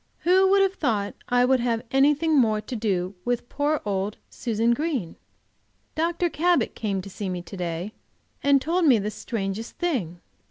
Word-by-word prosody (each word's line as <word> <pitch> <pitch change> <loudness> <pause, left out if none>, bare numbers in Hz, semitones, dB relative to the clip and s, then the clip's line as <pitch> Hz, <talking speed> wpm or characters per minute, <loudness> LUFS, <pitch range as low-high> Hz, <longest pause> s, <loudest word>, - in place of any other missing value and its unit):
WHO 375 +2 +4
would 395 0 +5
have 385 -1 +1
thought 215 - -1 0.2
I 245 0 +4
would 260 0 +3
have 235 -1 0
anything 295 +4 +3
more 220 -6 +3
to 215 +4 -6
do 195 -4 -1
with 245 0 -1
poor 295 +1 0
old 200 0 -2
Susan 230 -1 0
Green? 270 - -2 0.8
Dr. 340 +2 0
Cabot 340 -6 +1
came 200 -4 -2
to 195 - -9
see 195 0 -4
me 180 -1 -4
to 185 - -10
day, 175 +3 -4 0.5
and 280 -1 +4
told 335 +5 0
me 255 -5 +6
the 210 +1 -2
strangest 210 0 -4
thing! 225 - -2
235 Hz, 170 wpm, -25 LUFS, 200-300 Hz, 0.8 s, me